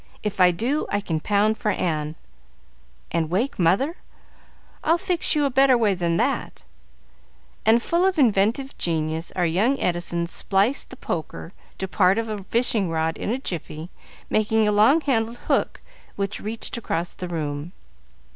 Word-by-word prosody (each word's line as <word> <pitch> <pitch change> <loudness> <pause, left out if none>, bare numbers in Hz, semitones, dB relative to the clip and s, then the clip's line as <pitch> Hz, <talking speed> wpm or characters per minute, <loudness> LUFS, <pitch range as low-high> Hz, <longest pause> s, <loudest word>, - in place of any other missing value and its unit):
If 205 -3 -2
I 180 - +8
do, 240 - -1
I 205 - 0
can 165 -6 -2
pound 210 +5 +1
for 215 - 0
Ann." 155 -5 -1 1.0
"And 160 -2 0
wake 210 +10 -1
mother. 195 - +2 0.9
I'll 330 +2 +3
fix 355 -3 0
you 295 -1 +2
a 275 - 0
better 265 0 +5
way 215 -4 +2
than 170 -2 0
that;" - - -1 1.0
and, 230 +1 +5
full 340 +1 +1
of 380 -2 0
inventive 235 +1 +2
genius, 160 0 -2
our 180 - +1
young 210 +12 +2
Edison 175 -1 -1
spliced 200 +8 0
the - - -10
poker 170 -4 -5 0.2
to 190 - -3
part 190 0 +3
of 230 0 -2
a 210 -2 -4
fishing 225 -3 +1
rod 160 0 0
in - - -4
a 240 - 0
jiffy, 170 - -6 0.4
making 215 0 +2
a - - +3
long 220 +10 +5
handled 235 -5 0
hook - - 0 0.3
which 200 0 -3
reached 220 +3 -4
across 175 -6 -3
the 180 - -6
room. 155 -1 -4
205 Hz, 160 wpm, -24 LUFS, 170-235 Hz, 1.0 s, I